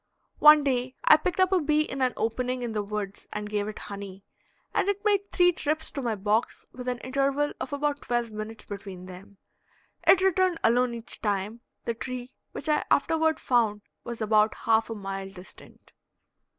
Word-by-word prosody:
One 300 0 +8
day 255 -2 -1
I - - +8
picked 345 +4 -2
up 370 0 +4
a 380 - +4
bee 300 0 +2
in 270 -3 -5
an 255 -1 +2
opening 250 +2 -1
in 235 - -3
the 215 -1 -1
woods 205 -1 -5
and 210 0 -4
gave 205 -1 -1
it 215 - -6
honey, 200 -1 -8 0.5
and 400 - +1
it 405 +1 -2
made 400 -1 +1
three 355 -1 +5
trips 310 -1 -2
to 280 - -4
my 235 -4 -1
box 210 +3 -1
with 250 0 -9
an 250 -1 -1
interval 275 +2 0
of - - -4
about 285 0 -1
twelve 240 -2 -1
minutes 215 +1 -7
between 195 -3 -8
them; 185 +2 -12 0.7
it 380 - +8
returned 370 -2 +2
alone 240 +1 +3
each 230 -1 -9
time; 205 +2 -2 0.2
the 235 - 0
tree, 250 +2 -6 0.2
which 290 - -7
I 300 -1 +2
afterward 320 +1 +2
found, 220 -5 +1 0.2
was 235 -1 -6
about 215 0 +3
half 225 0 +3
a 225 - -4
mile 195 -1 -5
distant. 190 -1 -15
240 Hz, 185 wpm, -27 LUFS, 210-295 Hz, 0.7 s, One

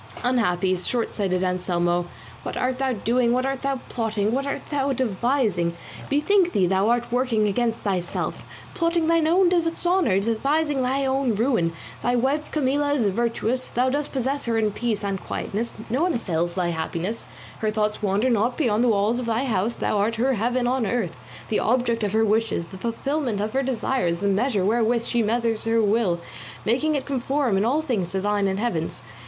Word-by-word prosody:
Unhappy, 195 -7 +2
shortsighted 190 -2 -1
Anselmo, 175 -1 0 0.3
what - - -5
art 255 0 -1
thou 265 -1 +1
doing, 235 +2 +1
what 255 +1 +1
art 270 0 -2
thou 275 -1 -1
plotting, 220 -3 -1
what 275 +3 -1
art 280 - -4
thou 280 -1 +1
devising? 220 -7 0 0.3
Bethink 350 +6 +3
thee 190 - +3
thou 190 +4 +2
art 240 0 0
working 240 -4 +2
against 230 +3 0
thyself, 185 -4 -2 0.3
plotting 335 -2 +1
thine 330 -1 +3
own 360 +3 +4
dishonour, 340 - +2
devising 275 +7 0
thine 265 +2 0
own 265 -3 +1
ruin. 225 -7 +1 0.3
Thy 245 - +1
wife 275 +5 0
Camilla 285 0 +1
is 230 -7 +2
virtuous, 235 +4 -1
thou 250 +2 +1
dost 290 +2 -1
possess 270 +2 -1
her 230 -1 0
in 215 -1 +1
peace 220 -1 -2
and 195 -2 -2
quietness, 225 +4 -4
no 250 +6 0
one 355 -1 +2
assails 175 -6 -1
thy 180 -2 0
happiness, 170 +6 -3 0.3
her 215 - 0
thoughts 215 0 -1
wander 210 +5 +1
not 235 +2 +1
beyond 235 -6 +2
the - - +3
walls 215 +2 +2
of 245 - -4
thy 230 +3 +1
house, 225 -1 0
thou 210 - 0
art 220 +3 +1
her 255 +4 +1
heaven 245 +3 0
on 250 -2 +1
earth, 195 -7 -1 0.3
the 215 - +1
object 235 -1 +1
of 205 - 0
her 220 0 +3
wishes, 220 -5 +1
the 190 - -11
fulfilment 240 +1 -2
of 210 +1 -2
her 270 - +2
desires, 250 -8 0
the 200 - +1
measure 200 0 +1
wherewith 230 +2 +2
she 240 - +1
measures 225 0 0
her 225 0 +2
will, 210 -5 +2 0.5
making 300 +7 +1
it 280 - -2
conform 270 -3 0
in 195 - +2
all 280 +8 +1
things 210 - -1
to 190 - 0
thine 205 0 +1
and 190 0 -1
Heaven's. 165 - -2
235 Hz, 185 wpm, -24 LUFS, 205-265 Hz, 0.5 s, own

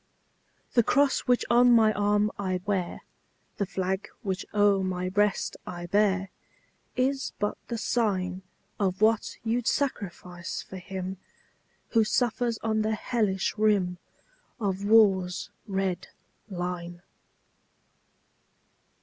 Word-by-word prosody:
The 240 - +6
cross 280 +4 +3
which 245 -1 +3
on 245 +1 +6
my 220 -2 +5
arm 205 +1 +2
I 185 -2 -1
wear, 190 -4 -1 0.6
The 200 - -1
flag 190 +2 -2 0.2
which 190 -1 -3
o'er 205 -2 +3
my 185 -1 -2
breast 205 +1 +1
I 175 -1 -5
bear, 195 0 +2 0.7
Is 270 +2 0
but 205 0 -1
the 235 - -3
sign 190 -6 0 0.4
Of 190 -2 0
what 220 0 +2
you 230 +2 +1
'd 240 - -7
sacrifice 180 -9 -2
for 190 - -9
him 185 +1 -5 0.7
Who 225 -2 +4
suffers 235 +1 0
on 220 -1 +1
the 215 0 0
hellish 210 -5 0
rim 195 -5 +2 0.6
Of 200 -3 -1
war's 195 -4 +4 0.2
red 190 -2 -1 0.4
line. 175 -1 -5
200 Hz, 115 wpm, -27 LUFS, 185-220 Hz, 0.7 s, The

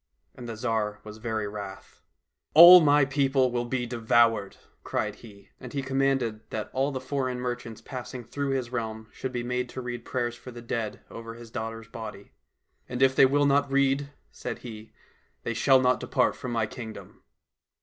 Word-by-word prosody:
And 120 -2 -9
the 115 - -5
Tsar 110 -3 -1
was 105 0 -10
very 110 -2 -2
wrath. 100 -2 -9 0.3
" - - -51
All 175 +3 +12
my 145 -2 +5
people 135 -2 +2
will 120 0 -1
be 125 0 -2
devoured," 115 -3 +2 0.3
cried 105 -1 -2
he. 100 -4 -15
And 125 - -9
he 140 -1 -2
commanded 135 -4 0
that 110 -1 -5
all 135 +2 +1
the 130 - -3
foreign 130 -1 -2
merchants 120 -2 -5
passing 125 -1 -7
through 140 +4 -3
his 130 -3 -2
realm 110 -2 -4
should 130 - -5
be 120 -1 -3
made 125 0 -2
to 130 - -6
read 120 -1 -5
prayers 120 -2 -2
for 120 +1 -11
the 120 -1 -9
dead 115 -2 -3
over 115 0 -8
his 115 -1 -12
daughter's 115 0 -5
body. 110 -3 -9 0.3
" - - -43
And 125 +1 0
if 130 0 +4
they 135 - +7
will 145 +2 +2
not 140 0 +2
read," 140 +1 +2 0.2
said - - -5
he, 110 -2 -9 0.3
" - - -40
they 115 - -2
shall 130 +3 +5
not 125 0 +2
depart 125 - +1
from 125 - -6
my 115 -2 +1
kingdom." 110 -1 -9
120 Hz, 190 wpm, -27 LUFS, 115-135 Hz, 0.3 s, All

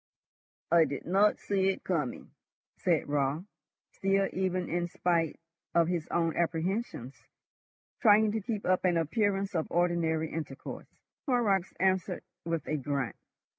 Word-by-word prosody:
"I 170 -1 +6
did 140 - -5
not 200 +4 +4
see 195 -1 +1
it 190 - -2
coming," 150 -9 -2 0.5
said 170 -4 +1
Raut, 145 +2 0 0.5
still, 195 0 +1
even 185 -1 -1
in 175 +1 -1
spite 170 -2 0 0.4
of 170 -1 +4
his 170 -3 -1
own 165 -1 0
apprehensions, 170 - -1 0.9
trying 215 -2 +6
to 220 +1 -2
keep 210 0 -3
up 185 0 +2
an 180 -2 +3
appearance 195 +4 0
of 160 -3 0
ordinary 170 -2 +1
intercourse. 145 -4 -6 0.4
Horrocks 210 -8 +2
answered 190 -1 +1 0.2
with 165 -1 -2
a 155 - 0
grunt. 140 -4 -2
175 Hz, 135 wpm, -30 LUFS, 160-195 Hz, 0.9 s, I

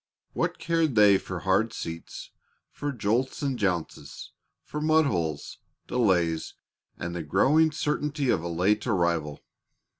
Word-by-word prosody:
What - - -1
cared 165 -5 0
they 105 -3 +6
for 90 -2 -6
hard 100 +4 +1
seats, 80 -6 -7 0.4
for 145 0 -4
jolts 120 +4 -1
and 135 -3 -1
jounces, 90 -5 -3 0.3
for 150 - -6
mud 155 0 +4
holes, 80 - -3 0.3
delays, 90 -9 0 0.4
and 85 0 -5
the 85 - -3
growing 135 - +3
certainty 150 -2 -1
of - - +1
a 85 - -4
late 95 +7 +1
arrival? 85 -8 0
105 Hz, 130 wpm, -27 LUFS, 85-140 Hz, 0.4 s, they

